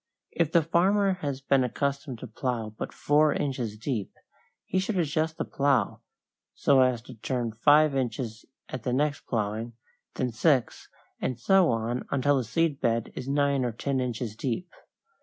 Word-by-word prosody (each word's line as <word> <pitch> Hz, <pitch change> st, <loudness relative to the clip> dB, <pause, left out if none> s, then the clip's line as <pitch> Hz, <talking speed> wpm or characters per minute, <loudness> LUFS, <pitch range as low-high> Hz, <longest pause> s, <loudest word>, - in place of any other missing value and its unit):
If 165 Hz, -3 st, 0 dB
the 170 Hz, -1 st, +4 dB
farmer 190 Hz, +5 st, +3 dB
has 140 Hz, -2 st, -3 dB
been 135 Hz, -1 st, +3 dB
accustomed 140 Hz, 0 st, -2 dB
to 130 Hz, -, -6 dB
plow 115 Hz, -1 st, -3 dB
but -, -, -5 dB
four 150 Hz, 0 st, +3 dB
inches 125 Hz, -7 st, -2 dB
deep, 115 Hz, -3 st, -3 dB, 0.5 s
he 185 Hz, -, 0 dB
should 195 Hz, +2 st, -1 dB
adjust 160 Hz, -1 st, 0 dB
the -, -, -2 dB
plow 135 Hz, -7 st, +1 dB, 0.6 s
so 135 Hz, -2 st, +4 dB
as 125 Hz, -3 st, +2 dB
to 125 Hz, -, -11 dB
turn 120 Hz, 0 st, -2 dB
five 145 Hz, +6 st, +4 dB
inches 120 Hz, -3 st, -3 dB, 0.2 s
at 130 Hz, -, -6 dB
the 125 Hz, +3 st, -2 dB
next 145 Hz, +2 st, 0 dB
plowing, 110 Hz, +1 st, -2 dB, 0.4 s
then 125 Hz, -1 st, -1 dB
six, 130 Hz, +2 st, +1 dB, 0.3 s
and 125 Hz, -2 st, -2 dB
so 190 Hz, +6 st, +4 dB
on 115 Hz, +2 st, -1 dB
until 140 Hz, +1 st, +2 dB
the 130 Hz, -, 0 dB
seed 145 Hz, +5 st, 0 dB
bed 115 Hz, -2 st, 0 dB
is 130 Hz, -, -6 dB
nine 140 Hz, -1 st, +2 dB
or 120 Hz, -, 0 dB
ten 130 Hz, +4 st, -2 dB
inches 120 Hz, -3 st, -3 dB
deep. 130 Hz, +10 st, -3 dB
130 Hz, 165 wpm, -27 LUFS, 120-145 Hz, 0.6 s, the